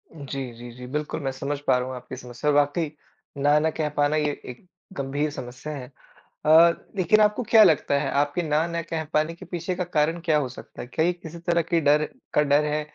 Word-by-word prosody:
जी, 135 -3 -5
जी, 120 +1 -10
जी, 125 +1 -10
बिल्कुल, 150 +3 -3
मैं 135 - -1
समझ 140 +2 -4
पा - - +5
रहा 125 0 -2
हूँ 130 - -5
आपकी 125 +1 -8
समस्या 125 +3 -4
और 145 - +3
वाक़ई, 145 +2 +2 0.5
ना 145 +2 +4
न 160 - +1
कह 155 -2 0
पाना 145 +1 +3
ये 150 -1 +1 0.2
एक 125 +8 -10 0.3
गंभीर 140 +2 -1
समस्या 130 +3 -7
है। 135 -2 -8 0.5
अ, 155 - +2 0.5
लेकिन 190 +4 +4
आपको 210 +4 +2
क्या 220 -2 +8
लगता 150 -5 +3
है 140 -2 -1
आपके 145 +4 -1
ना 155 +1 +1
न 170 0 -2
कह 160 -1 -2
पाने 155 +2 +1
के - - -12
पीछे 175 +1 -3
का 180 - -1
कारण 165 -1 0
क्या 155 -2 +3
हो 130 -4 -2
सकता 130 - -10
है? - - -8
क्या 160 +5 0
ये 175 - +2
किसी 170 -1 -10
तरह 170 0 +1
की 165 0 0
डर 150 +1 +4 0.3
का - - +4
डर 145 +1 +3
है? 150 0 0
150 Hz, 230 wpm, -25 LUFS, 140-165 Hz, 0.5 s, क्या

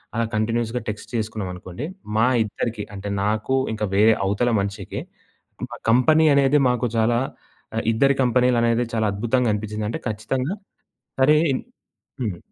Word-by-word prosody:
అలా 115 - +1
కంటిన్యూయస్‌గా 115 +2 -1
టెక్స్ట్ 105 - -6
చేసుకున్నాం 110 -3 -3
అనుకోండి. 90 +9 -7 0.3
మా 115 +3 +4 0.2
ఇద్దరికి 110 0 -4
అంటే, 100 +1 -5
నాకు 110 +5 0 0.2
ఇంకా 105 -1 -2
వేరే 110 +2 +6
అవతల 105 +5 +1
మనిషికి, 100 +1 -4 0.7
మా - - -8
కంపెనీ 155 +6 +5
అనేది 140 +1 +4
మాకు 125 0 0
చాలా 115 +1 +3 0.6
ఆహ్, - - -1
ఇద్దరి 140 +4 +3
కంపెనీ‌లనేది 120 -1 +2
చాలా 110 -1 +1
అద్భుతంగా 120 +3 +1
అనిపిచ్చిందంటే 105 +1 -3
ఖచ్చితంగా 130 - -2 0.7
సరే 150 +3 +6 0.2
ఇన్ 130 - -2 0.6
హ్మ్. 100 -7 -2
115 Hz, 135 wpm, -23 LUFS, 105-125 Hz, 0.7 s, వేరే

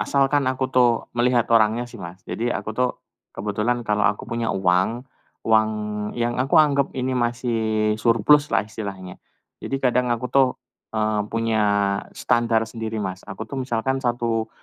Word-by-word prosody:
asalkan 140 -1 +2
aku 130 0 -1
tuh 120 -2 +3
melihat 120 -1 +2
orangnya 115 +2 +3
sih, 120 -3 -12
Mas. 90 +1 -9
Jadi, 120 +2 -2
aku 110 - -3
tuh 125 +1 +1 0.5
kebetulan 105 +4 -1
kalau 105 0 +1
aku - - -3
punya 115 0 -2
uang, 95 +6 +1 0.4
uang 110 -1 +4 0.5
yang 120 0 0
aku 135 +6 +2
anggap 140 -3 +3
ini 130 0 -1
masih 120 -1 -1 0.4
surplus 120 +6 +4
lah - - +2
istilahnya. 100 -5 -7 0.4
Jadi, 135 - -2
kadang 125 -1 +1
aku 120 +1 -1
tuh, 135 -2 +5 0.5
eee, 110 -1 +1
punya 115 -1 0 0.5
standar 115 -2 +1
sendiri, 110 -1 -5
Mas, 95 -2 -4
aku 95 - -6
tuh 135 -2 -5
misalkan 130 +1 -1
1 115 -2 -1
115 Hz, 150 wpm, -23 LUFS, 110-125 Hz, 0.5 s, tuh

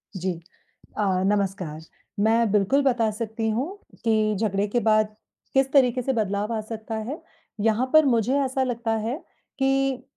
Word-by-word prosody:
जी 180 -2 -3 0.6
अ, 210 - +1 0.2
नमस्कार। 195 -6 -1 0.4
मैं 225 0 +3
बिल्कुल 210 +7 +3
बता 240 -5 +2
सकती 220 +1 -3
हूँ 235 +7 0 0.4
कि 215 -2 +2
झगड़े 205 -2 0
के 240 +4 0
बाद 215 -1 +2 0.4
किस 270 0 +2
तरीके 255 -3 +4
से 265 +2 -1
बदलाव 210 0 -1
आ 225 - -1
सकता 220 +1 -6
है। 235 +9 -5 0.4
यहाँ 225 +4 +2
पर 310 -1 +7
मुझे 245 +1 +2
ऐसा 265 0 0
लगता 235 -2 -2
है 235 +4 -1 0.4
कि 270 -1 +1
225 Hz, 155 wpm, -25 LUFS, 210-255 Hz, 0.6 s, पर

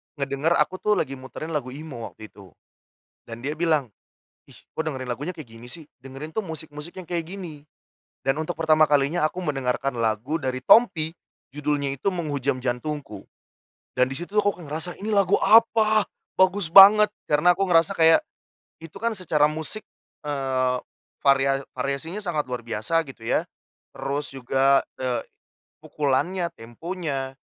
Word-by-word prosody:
ngedenger 140 +3 0
aku 185 - 0
tuh 210 +2 +1
lagi 135 -8 -1
muterin 130 +5 -8
lagu 135 -5 -3
emo 140 -6 -8
waktu 110 -1 -12
itu, 95 -4 -16 0.7
dan 115 0 -9
dia 150 +3 -4
bilang, 155 -7 +1 0.6
"ih - - -18 0.2
kok 160 - 0
dengerin 130 -5 -4
lagunya 145 +9 -3
kayak 155 -8 -11
gini 115 +2 -13
sih 160 -3 -9 0.2
dengerin 135 +3 -8
tuh 220 - 0
musik-musik 160 +2 -8
yang 175 - -13
kayak 170 -2 -2
gini", 160 -7 -8 0.6
dan 135 +3 0
untuk 160 - -3
pertama 155 -1 +4
kalinya 150 +3 +2
aku 180 +3 -5
mendengarkan 135 -4 -2
lagu 115 +8 0
dari 130 -3 -3
Tompi 160 - +5 0.4
judulnya 145 -1 -1
itu 195 - -1
Menghujam 140 -6 -2
Jantungku 130 -3 -4 0.7
dan 125 - +5
disitu 175 +10 -5
aku 205 -1 +3
kayak 145 - -10
ngerasa 160 +3 -3
ini 215 - -3
lagu 200 -2 +2
apa, 220 -1 +5 0.3
bagus 185 -2 +4
banget 205 +3 +9 0.2
karena 155 +4 +3
aku 195 - +1
ngerasa 170 +2 +4
kayak 165 - +6 0.6
itu 165 -1 -12
kan 230 -2 -1
secara 150 -5 +2
musik, 160 +8 -3 0.4
eee, 130 -3 0 0.5
varia 135 0 +3
variasinya 140 +9 -3
sangat 170 -7 -2
luar 125 -1 -5
biasa 115 +8 -1
gitu 115 -4 -12
ya, - - 0 0.5
terus 145 +1 -3
juga, 135 +1 +2 0.2
eee, 125 -2 -1 0.6
pukulannya, 170 +6 -1
temponya, 135 +2 -5
150 Hz, 150 wpm, -24 LUFS, 135-170 Hz, 0.7 s, banget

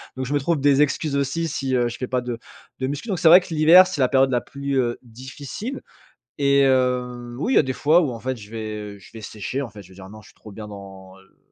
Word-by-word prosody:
Donc 130 -1 -4
je 140 - -3
me - - +2
trouve 155 +2 0
des 145 +1 +4
excuses 150 0 -2
aussi 140 +4 -1
si, 135 -3 -3
heu, 120 -1 +2
je 120 - -6
fait 125 - -3
pas 125 0 -1
de 120 -1 -5 0.4
de 130 - -1
muscu. 145 - -5
Donc 195 -4 -2
c'est 165 - +2
vrai 175 +3 +10
que 180 - -12
l'hiver, 165 +4 +7
c'est 185 -5 -5
la 130 - +4
période 135 0 +3
la 125 -2 0
plus, 140 0 -4
heu, 120 -2 -1
difficile 130 - -8 0.6
et 140 -1 +3
heu, 125 -2 0
oui, 245 - 0
il - - +2
y - - +9
a - - +5
des 130 -2 -3
fois 155 +6 +3
où, 145 - -1
en 115 - -8
fait, 130 +1 -3
je 105 -2 -13
vais, 110 -1 -5 0.2
heu, - - -16
je 95 - -17
vais 110 - -9
sécher, 110 +6 -5
en 125 - -7
fait, 105 0 -12
je 90 - -18
vais 95 - -17
dire: 95 0 -12
«Non, 110 +1 -12
je 105 - -18
suis - - -21
trop 105 - -14
bien 105 +1 -9
dans, 95 -2 -12
heu» 95 0 -25
130 Hz, 290 wpm, -22 LUFS, 115-145 Hz, 0.6 s, vrai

